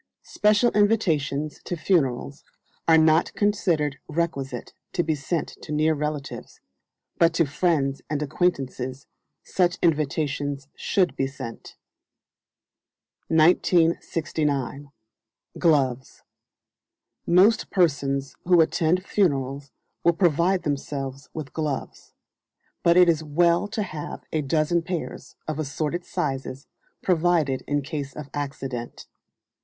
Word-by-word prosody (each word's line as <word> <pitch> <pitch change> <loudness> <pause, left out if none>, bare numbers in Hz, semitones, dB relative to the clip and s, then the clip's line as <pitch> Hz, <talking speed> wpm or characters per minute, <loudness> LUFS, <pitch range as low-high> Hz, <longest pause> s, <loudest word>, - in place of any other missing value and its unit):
Special 210 +3 +3
invitations 160 -9 +1
to 175 - -4
funerals 140 -5 0 0.4
are 165 -1 +7
not 160 +1 +4
considered 170 -9 +1
requisite 140 -6 -3 0.2
to 175 - +1
be 160 - 0
sent 150 +3 -2
to - - -9
near 155 +1 +2
relatives; 150 -1 -5 0.6
but 165 0 +4
to 165 - +3
friends 145 -2 0
and 150 0 -1
acquaintances 135 -4 -2 0.4
such 180 -1 +1
invitations 145 -3 0
should 185 -3 +1
be 135 - 0
sent. 130 -4 -9 1.5
1969. 160 -4 +1 0.7
Gloves. 135 -6 +1 1.0
Most 190 +6 +4
persons 140 -6 +1
who 175 -1 +5
attend 170 +3 +2
funerals 140 -8 0 0.3
will 170 - +5
provide 175 +2 +2
themselves 140 -1 -4
with 150 -4 -7
gloves; 150 -4 -4 0.7
but 170 +1 +4
it 180 -1 +7
is 160 -2 +2
well 170 +5 +2
to 215 0 -2
have 155 -6 -7
a 155 - +1
dozen 155 +4 +1
pairs, 170 0 -5
of 155 -1 -3
assorted 155 +3 -2
sizes, 135 -3 -3 0.4
provided 165 -6 +2
in 145 0 0
case 140 -1 -5
of 150 -2 -8
accident. 135 -4 -5
155 Hz, 105 wpm, -25 LUFS, 140-170 Hz, 1.5 s, are